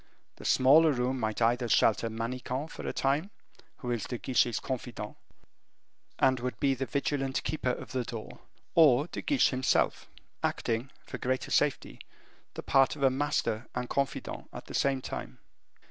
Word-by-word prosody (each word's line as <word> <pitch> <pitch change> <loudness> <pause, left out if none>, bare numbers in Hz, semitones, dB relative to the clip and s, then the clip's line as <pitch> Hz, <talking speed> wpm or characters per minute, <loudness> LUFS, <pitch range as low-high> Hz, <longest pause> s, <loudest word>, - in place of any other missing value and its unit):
The - - -11
smaller 150 +5 +6
room 125 +1 -1
might 110 0 -1
either 120 +1 +2
shelter 110 +1 +3
Manicamp 125 +6 -4
for - - -7
a - - 0
time, 145 +8 0 0.5
who 125 -3 -4
is 120 -3 -1
De 120 - -4
Guiche's 120 -2 +1
confidant, 120 -5 -5 1.0
and 130 -1 +3
would 125 +1 -4
be 140 -1 +3
the 135 0 -3
vigilant 140 -2 -1
keeper 155 -4 -1
of 125 -2 -4
the 130 0 -1
door, 115 -2 -8 0.3
or 145 -4 +6
De - - -6
Guiche 285 -2 +3
himself, 130 0 +1 0.3
acting, 115 +3 -1 0.2
for - - -7
greater 130 +1 -2
safety, - - +1 0.6
the - - -6
part 135 +1 +3
of 140 - -5
a 135 - +5
master 130 -4 -1
and 125 0 -2
confidant 140 -2 -2
at - - -9
the - - -10
same 135 -2 +1
time. - - -6
130 Hz, 160 wpm, -30 LUFS, 120-140 Hz, 1.0 s, smaller